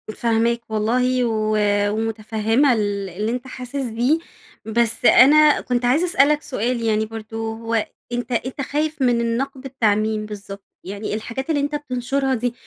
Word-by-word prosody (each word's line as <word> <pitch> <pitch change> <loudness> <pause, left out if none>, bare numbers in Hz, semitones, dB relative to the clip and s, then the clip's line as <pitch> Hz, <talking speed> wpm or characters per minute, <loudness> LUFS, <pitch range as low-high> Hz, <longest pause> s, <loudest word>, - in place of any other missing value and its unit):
فاهماك 235 0 +1
والله 250 +4 +1
و 215 -2 0 0.3
ومتفهمة 225 +4 +1
ال 205 -3 -2
اللي 210 +6 -3
أنتَ 250 +1 -4
حاسس 255 0 -9
بيه. 255 +3 +1 0.5
بس 230 +1 0
أنا 300 +4 +7
كنت 245 -1 -1
عايزة 290 +8 +3
أسألك 300 -3 +3
سؤال 245 -3 -2
يعني 220 -1 +1
برضو 225 0 -6
هو 225 -1 -1 0.3
أنتَ 245 0 -3
أنتَ 255 +4 -2
خايف 300 +2 -2
من 240 -2 +3
النقد 255 +4 -2
بتاع 250 -6 +1
مين 215 0 -1
بالضبط؟ 200 -1 -9 0.2
يعني 200 +2 -5
الحاجات 235 +7 -5
اللي 295 -3 +1
أنتَ 290 +1 -2
بتنشرها 270 -1 -1
دي، 245 +1 -2
235 Hz, 150 wpm, -21 LUFS, 220-265 Hz, 0.5 s, أنا